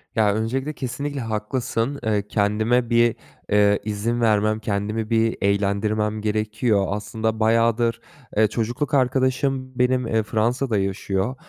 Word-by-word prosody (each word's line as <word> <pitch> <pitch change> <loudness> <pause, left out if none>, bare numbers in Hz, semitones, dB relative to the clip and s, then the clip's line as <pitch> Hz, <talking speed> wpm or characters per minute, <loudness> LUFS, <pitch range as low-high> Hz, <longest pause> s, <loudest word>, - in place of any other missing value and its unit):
Ya, 105 -2 +3
öncelikle, 130 +7 -2
kesinlikle 140 +3 -4
haklısın. 115 +4 -2
Eee, 105 -2 0
kendime 110 +4 +1
bir, 120 -1 +3 0.4
eee, 105 0 +4
izin 110 +3 -1
vermem, 110 -1 +2
kendimi 105 +1 -2
bir 115 -1 +1
eğlendirmem 105 +2 0
gerekiyor. 105 -1 0
Aslında 110 +2 -2
bayağıdır, 115 +1 +2 0.4
eee, 110 - +5
çocukluk 120 +6 -2
arkadaşım 130 0 +1
benim, 125 -1 +2
eee, 110 -1 +1
Fransa'da 115 +2 0
yaşıyor 95 +4 -1
110 Hz, 120 wpm, -23 LUFS, 105-120 Hz, 0.4 s, eee